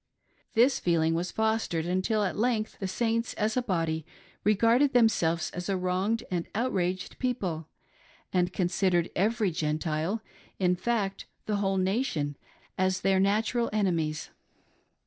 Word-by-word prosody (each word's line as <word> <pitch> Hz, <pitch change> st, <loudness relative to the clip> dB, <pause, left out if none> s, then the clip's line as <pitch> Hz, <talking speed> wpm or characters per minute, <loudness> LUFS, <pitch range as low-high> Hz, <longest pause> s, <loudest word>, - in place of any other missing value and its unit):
This 250 Hz, +4 st, +4 dB
feeling 165 Hz, -2 st, +2 dB
was 175 Hz, +2 st, -1 dB
fostered, 220 Hz, -7 st, 0 dB
until 185 Hz, +5 st, +1 dB
at 190 Hz, -, -1 dB
length 225 Hz, -1 st, 0 dB
the 195 Hz, -, -2 dB
Saints 230 Hz, +3 st, -1 dB
as 215 Hz, 0 st, 0 dB
a 255 Hz, -, +2 dB
body 165 Hz, -7 st, -1 dB, 0.4 s
regarded 230 Hz, +7 st, +4 dB
themselves 170 Hz, -9 st, +3 dB
as 180 Hz, +2 st, -5 dB
a 195 Hz, -, +1 dB
wronged 185 Hz, +5 st, 0 dB
and 175 Hz, -2 st, -1 dB
outraged 185 Hz, -6 st, -1 dB
people, 185 Hz, -, -2 dB, 0.7 s
and 180 Hz, -1 st, +2 dB
considered 175 Hz, -1 st, +1 dB
every 210 Hz, +1 st, +1 dB
Gentile— 155 Hz, +6 st, -1 dB, 0.3 s
in 180 Hz, -1 st, +2 dB
fact 195 Hz, 0 st, -1 dB, 0.2 s
the 210 Hz, -1 st, 0 dB
whole 195 Hz, -1 st, 0 dB
nation 185 Hz, -, 0 dB, 0.4 s
as 185 Hz, 0 st, +1 dB
their 190 Hz, -1 st, +3 dB
natural 220 Hz, +4 st, +1 dB
enemies. 170 Hz, -7 st, 0 dB
190 Hz, 130 wpm, -28 LUFS, 175-220 Hz, 0.7 s, This